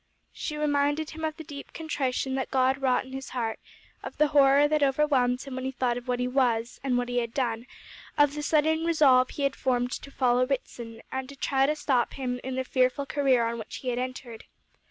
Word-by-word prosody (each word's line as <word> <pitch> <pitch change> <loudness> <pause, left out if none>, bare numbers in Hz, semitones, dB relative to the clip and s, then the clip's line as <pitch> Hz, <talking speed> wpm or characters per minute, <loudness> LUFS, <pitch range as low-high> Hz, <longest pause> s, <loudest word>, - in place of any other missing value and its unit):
She 300 - -5
reminded 290 +1 0
him 320 0 -8
of 315 -1 -2
the 320 - -7
deep 285 -3 -10
contrition 270 -4 -2
that 265 0 -2
God 265 0 +2
wrought 255 -2 +2
in 260 - -12
his 265 0 -6
heart; 230 -3 -3 0.4
of - - -8
the 300 -1 +3
horror 280 0 +5
that 305 0 +1
overwhelmed 270 -3 +2
him 275 - -8
when 260 0 -4
he - - 0
thought 250 -2 -1
of 245 +1 -7
what 250 -1 -1
he 250 - 0
was, 245 -2 0
and 255 -3 +1
what 245 0 -1
he 245 0 0
had 235 -1 -4
done; 235 -2 -1 0.5
of 290 -1 +4
the 300 - -4
sudden 315 +2 +2
resolve 280 -6 +4
he 285 - -5
had 275 -1 +1
formed 250 -1 0
to 275 - -6
follow 250 -2 +2
Ritson, 235 -4 -5
and 265 +1 -5
try 270 -1 +2
to 300 - +1
stop 260 -5 0
him 250 -2 -3
in 260 0 -4
the 260 - -1
fearful 255 +2 +1
career 270 -4 +2
on 230 0 -3
which 220 - -8
he 255 - -4
had 245 0 -1
entered. 250 -2 -6
265 Hz, 220 wpm, -27 LUFS, 250-285 Hz, 0.5 s, horror